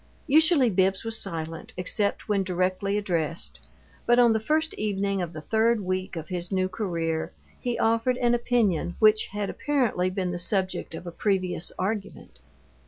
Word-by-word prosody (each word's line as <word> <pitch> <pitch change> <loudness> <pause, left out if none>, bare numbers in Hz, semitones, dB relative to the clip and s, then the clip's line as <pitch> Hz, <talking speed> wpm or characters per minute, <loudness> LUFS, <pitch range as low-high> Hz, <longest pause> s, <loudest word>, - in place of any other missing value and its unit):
Usually 310 -4 +5
Bibbs 190 +1 +2
was 225 -1 -1
silent, 165 -3 -5
except 200 +3 -1
when 205 -2 +2
directly 185 +2 0
addressed, 170 -5 -1 0.5
but 240 - +5
on 240 -2 +6
the 220 - +1
first 310 +7 0
evening 200 -2 -1
of 175 -2 -3
the 155 - -8
third 225 +5 +2
week 185 0 -3
of 160 -1 -6
his 175 0 -3
new 185 -1 +1
career 170 -5 -2 0.3
he 245 -1 -2
offered 230 +3 +2
an 240 -1 +2
opinion 220 -8 +1
which 215 0 +4
had 205 0 -3
apparently 245 -12 0
been 185 -1 -2
the 175 - -4
subject 190 -2 -1
of 175 0 -8
previous 185 -4 0
argument. 195 - -4
195 Hz, 160 wpm, -26 LUFS, 180-225 Hz, 0.5 s, on